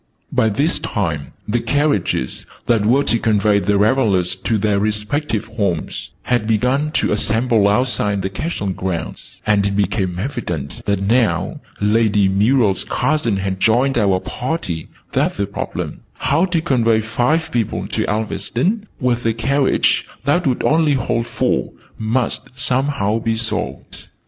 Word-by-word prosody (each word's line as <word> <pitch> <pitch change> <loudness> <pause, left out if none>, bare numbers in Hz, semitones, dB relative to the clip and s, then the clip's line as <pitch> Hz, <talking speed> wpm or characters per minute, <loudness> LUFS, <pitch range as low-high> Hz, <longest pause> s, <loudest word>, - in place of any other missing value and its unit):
By 110 - +2
this 140 +11 +1
time 80 -9 -3
the 115 +3 +1
carriages, 115 - 0 0.2
that 115 -3 +2
were 135 +5 +4
to 115 - +1
convey 105 -2 +3
the 100 0 +1
revelers 100 -5 +2
to 110 +4 -1
their 105 -1 +1
respective 105 +3 -1
homes, 100 -7 -3
had 120 -3 0
begun 125 +7 +1
to - - +1
assemble 110 0 +2
outside 105 -3 +1
the 95 - -1
Castle 100 - -3
grounds: 90 -3 -5
and 105 -2 +3
it 100 - -2
became 95 -3 0
evident 90 - -4
now 100 -1 +1 0.2
that - - -6
Lady 105 -2 +3
Muriel's 105 +1 +3
cousin 145 -9 0
had 95 -1 -2
joined 125 +6 +3
our 100 -3 +2
party 120 - -4 0.3
that - - +1
the 100 - -1
problem, 100 - -5
how 160 +6 +1
to 175 -3 0
convey 115 -7 +2
five 125 +9 0
people 115 -3 -1
to - - -1
Elveston, 125 - -1
with 120 -1 0
a 115 - +1
carriage 135 +4 +2 0.2
that 165 +4 +2
would 125 - 0
only 155 -1 +3
hold 115 -2 -1
four, - - -1 0.3
must 115 +3 -1
somehow 130 -4 +1
be 115 0 0
solved. 110 -2 -4
110 Hz, 145 wpm, -19 LUFS, 100-130 Hz, 0.3 s, were